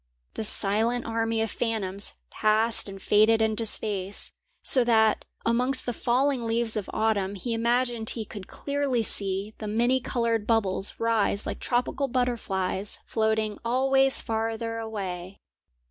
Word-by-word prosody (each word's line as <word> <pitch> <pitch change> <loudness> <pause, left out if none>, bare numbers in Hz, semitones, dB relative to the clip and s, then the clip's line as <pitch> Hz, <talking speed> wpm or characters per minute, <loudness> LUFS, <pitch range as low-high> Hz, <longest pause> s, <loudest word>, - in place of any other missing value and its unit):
The - - -4
silent 220 +4 +1
army 225 0 -1
of 225 - -3
phantoms 205 -4 -2 0.2
passed 215 0 +2
and 195 0 -9
faded 215 +3 +4
into 220 0 +2
space, 200 -2 +1 0.3
so 255 - +7
that 220 -2 +3 0.2
amongst 250 +3 +2
the 245 - -2
falling 255 +3 +1
leaves 230 0 0
of 210 -3 -3
autumn 205 -3 0
he 230 +5 -4
imagined 235 0 0
he 225 -2 -1
could 200 -2 -9
clearly 280 -4 -2
see 200 0 -1
the 215 - -5
many 240 +5 +2
coloured 230 -3 -1
bubbles 200 -4 +1
rise 225 -3 +1
like - - -5
tropical 250 +3 -1
butterflies 215 -6 -2
floating 220 -1 -1
always 270 +3 +2
farther 225 0 -3
away. 195 -4 -6
225 Hz, 135 wpm, -26 LUFS, 210-240 Hz, 0.3 s, so